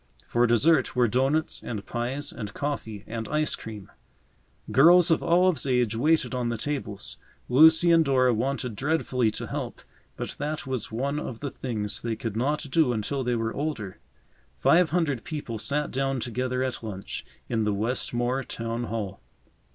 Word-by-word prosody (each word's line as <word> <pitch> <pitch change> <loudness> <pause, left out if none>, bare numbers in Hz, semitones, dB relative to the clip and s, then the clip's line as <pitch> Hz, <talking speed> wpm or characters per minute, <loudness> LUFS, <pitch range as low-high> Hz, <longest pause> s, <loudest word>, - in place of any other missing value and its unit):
For 120 +1 +2
dessert 130 +5 +3
were 125 -1 +4
doughnuts 135 +7 +1
and 105 -4 -5
pies 130 +5 -2
and 105 -3 -7
coffee 115 -8 -4
and 115 -1 -5
ice 150 -1 +1
cream. 110 -5 -9 0.8
Girls 170 +5 +7
of 165 - +3
Olive's 175 -5 +3
age 125 -4 +2
waited 155 +5 +2
on 125 -2 -1
the 115 - -2
tables. 110 -7 -5 0.3
Lucy 160 +6 +6
and 165 -1 +6
Dora 130 -3 +3
wanted 125 0 -2
dreadfully 130 -3 +1
to - - -5
help, - - -5 0.3
but - - -4
that 150 +1 -3
was 130 -5 -3
one 140 +6 -1
of 120 -6 -6
the 140 -2 -4
things 105 -5 -3
they 115 -1 -2
could 110 -1 -5
not 145 +7 0
do 150 -4 +3
until 130 +5 -2
they 120 -1 0
were 115 0 -1
older. 130 -10 -4 0.6
Five 170 -1 +4
hundred 150 -8 0
people 145 -8 -5
sat 145 +6 -1
down 135 0 -1
together 125 +2 -2
at 130 -4 -3
lunch 100 -4 -6 0.2
in 115 -2 0
the 105 - +1
Westmore 120 +4 -1
Town 115 0 -4
Hall. 105 -4 -4
125 Hz, 165 wpm, -26 LUFS, 115-145 Hz, 0.8 s, Girls